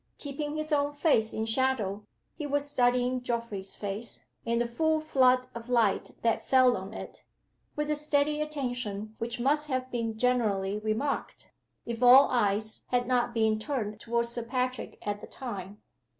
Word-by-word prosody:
Keeping 295 +1 -4
his 310 +1 -3
own 290 -1 +2
face 285 -7 +2
in 220 - -2
shadow, 225 -4 0 0.3
he 300 -2 -5
was 285 0 0
studying 250 -1 +2
Geoffrey's 230 -5 -2
face, 205 +3 -3 0.2
in 235 0 +1
the 240 - +1
full 315 +6 +1
flood 255 -4 +3
of 235 +1 -8
light 230 -5 +2
that 230 -1 +2
fell 255 -2 +4
on 190 +2 -6
it, - - -9 0.5
with 300 0 -1
a - - +2
steady 295 0 +1
attention 245 -8 -3
which 235 +1 -3
must 295 +4 +2
have 255 -2 -2
been 230 -2 -2
generally 210 -5 +1
remarked, 220 +7 -3 0.3
if 235 0 -5
all 255 +3 +8
eyes 215 -2 0
had 245 -1 +1
not 245 -1 +1
been 220 -2 +1
turned 215 -4 -3
toward 235 +1 0
Sir 235 +1 -1
Patrick 255 +2 -3
at 205 0 -3
the - - -9
time. 205 -5 -7
245 Hz, 165 wpm, -29 LUFS, 220-275 Hz, 0.5 s, all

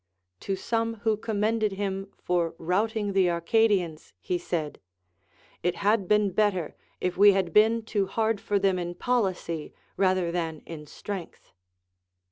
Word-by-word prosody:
To 195 - -2
some 230 +2 -1
who 220 -2 +2
commended 215 0 0
him 195 0 -3
for 170 -2 -1
routing 205 +4 0
the 190 -2 +4
Arcadians 175 -2 +1
he 180 - -2
said, 160 -4 -3 0.8
It 175 - 0
had 205 -1 +1
been 210 -1 +3
better 185 -4 0 0.2
if 180 -1 -2
we 205 +1 +8
had 190 -4 -1
been 220 +2 +4
too 205 -3 0
hard 220 +1 0
for 205 - 0
them 190 -2 +2
in 175 0 -4
policy 185 -10 -1 0.2
rather 185 -3 +2
than 165 -3 -3
in 150 -2 -8
strength. 190 +2 -8
195 Hz, 140 wpm, -27 LUFS, 175-215 Hz, 0.8 s, we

